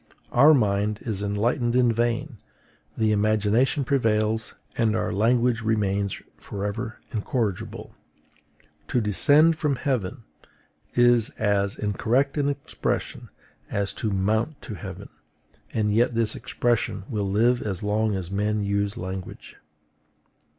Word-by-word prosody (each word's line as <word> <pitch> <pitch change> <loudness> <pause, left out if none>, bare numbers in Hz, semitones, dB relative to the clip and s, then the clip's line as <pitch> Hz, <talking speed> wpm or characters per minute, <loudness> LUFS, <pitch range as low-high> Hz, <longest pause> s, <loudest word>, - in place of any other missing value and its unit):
Our 145 +5 +7
mind 105 -3 +1
is 105 -4 -3
enlightened 120 +4 0
in 125 -2 +4
vain; 120 +3 -1 0.6
the 110 -1 +2
imagination 110 +6 +2
prevails, 110 -4 0 0.2
and 110 -2 +1
our - - -1
language 115 +3 +2
remains 100 -3 0 0.2
forever 105 +3 -5 0.2
incorrigible. 110 -3 -3 0.9
To 125 - +1
DESCEND 145 +9 +5
FROM 150 -3 +1
HEAVEN 125 -3 -2 0.7
is 120 -2 +4
as 100 -1 0
incorrect 115 +6 0
an 145 0 +1
expression 140 -1 -3 0.4
as 100 -1 -1
to 110 - -2
MOUNT 110 +8 0
TO - - -8
HEAVEN; 100 - -8 0.6
and 105 -2 0
yet 120 +2 +2
this 115 -1 0
expression 120 -5 -1
will 105 -5 -2
live 120 +5 +2
as 100 -3 -4
long 105 0 +1
as 95 -1 -5
men 105 +1 0
use 100 0 -1
language. 95 +1 -7
110 Hz, 120 wpm, -25 LUFS, 100-120 Hz, 0.9 s, Our